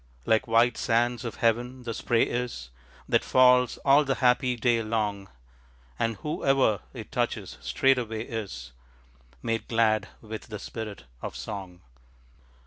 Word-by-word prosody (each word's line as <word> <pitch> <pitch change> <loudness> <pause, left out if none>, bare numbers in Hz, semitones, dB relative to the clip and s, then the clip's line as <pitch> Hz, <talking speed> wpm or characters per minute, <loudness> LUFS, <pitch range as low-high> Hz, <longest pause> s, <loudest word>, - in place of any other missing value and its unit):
Like 110 +1 +2
white 115 +1 +3
sands 120 +1 +1
of 115 - -5
heaven 120 +3 0
the 115 -1 -4
spray 115 +1 +2
is 120 - -3 0.4
That - - +2
falls 125 -1 +4
all 140 +2 +6
the 135 -2 0
happy 125 0 +2
day 120 0 +2
long, 105 -3 -2 0.7
And 115 -1 0
whoever 135 -3 +1
it - - -9
touches - - -2
straightway 120 -5 +1
is 90 - -6 0.7
Made 115 -1 -2
glad 110 -2 +2
with 110 -1 -8
the 105 - -6
spirit 105 0 -7 0.2
of - - -6
song. 95 -3 -7
115 Hz, 135 wpm, -27 LUFS, 110-125 Hz, 0.7 s, all